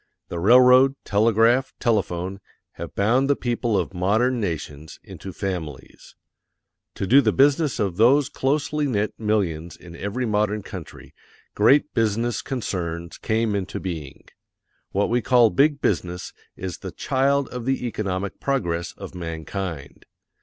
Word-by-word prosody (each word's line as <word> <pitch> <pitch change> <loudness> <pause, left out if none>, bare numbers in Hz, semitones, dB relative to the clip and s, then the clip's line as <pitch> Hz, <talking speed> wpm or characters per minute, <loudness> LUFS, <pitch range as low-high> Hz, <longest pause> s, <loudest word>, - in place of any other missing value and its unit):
The 85 - -4
railroad, 125 +6 +6
telegraph, 115 +5 +2
telephone_ 95 -5 -1 0.3
have - - -9
bound 125 +7 +2
the 140 - +4
people 120 -4 -1
of 90 0 -2
MODERN 110 +8 +1
NATIONS 80 -6 -5
into 95 - -9
FAMILIES. 80 -8 -6 0.8
To - - -3
do 135 +8 +6
the 110 -5 +2
business 145 +3 +2
of 95 -4 -1
these 130 +6 +5
closely 145 +1 -1
knit 105 -4 -1
millions 95 -7 -1
in 85 -1 -12
every 100 +8 -3
modern 105 -1 0
country - - -10 0.4
GREAT 150 +2 +3
BUSINESS 115 +2 0
CONCERNS 85 -9 -4
CAME 110 0 0
INTO 100 -3 -3
BEING. 80 -7 -7 0.7
What 100 +3 0
we 120 +1 +2
call 120 -1 +4
big 145 +1 +2
business 90 -2 -2 0.2
is 90 -1 -6
the - - -7
CHILD 140 +1 0
OF 125 -2 -6
THE 135 -1 -1
ECONOMIC 100 -4 -3
PROGRESS 85 -12 -2
OF - - -10
MANKIND. 80 -2 -6
105 Hz, 135 wpm, -23 LUFS, 90-125 Hz, 0.8 s, railroad